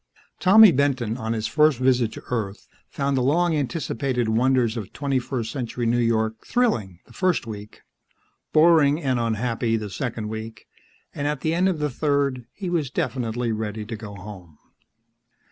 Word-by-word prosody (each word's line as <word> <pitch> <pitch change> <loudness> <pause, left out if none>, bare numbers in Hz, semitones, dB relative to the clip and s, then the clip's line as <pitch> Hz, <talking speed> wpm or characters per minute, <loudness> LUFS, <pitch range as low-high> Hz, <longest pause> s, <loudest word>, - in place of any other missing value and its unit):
Tommy 205 +2 +8
Benton, 130 -6 0
on 110 -2 -3
his 110 -1 -3
first 150 -1 +3
visit 125 -3 +2
to - - -9
Earth, 105 -5 -3 0.2
found 140 0 -1
the 130 - +1
long 165 +6 +2
anticipated 135 -4 -1
wonders 120 0 +2
of 110 -5 -6
twenty 135 -2 0
first 120 -3 -4
century 125 -2 -3
New 120 +1 +2
York 110 -1 0
thrilling 115 - 0
the - - -18
first 185 -7 0
week, 105 -2 -9 0.7
boring 155 -2 +5
and 130 -6 0
unhappy 115 0 0
the 105 -2 -6
second 110 +1 -4
week, 110 0 -7 0.5
and 145 - -2
at 150 -2 -2
the 160 - 0
end 180 +3 +2
of 180 - -1
the 150 -1 -1
third 140 -3 0
he 195 - -7
was 165 -6 -1
definitely 120 -2 -2
ready 110 -1 -4
to 115 +1 -5
go 105 -2 -9
home. 90 -5 -11
125 Hz, 165 wpm, -24 LUFS, 110-145 Hz, 0.7 s, Tommy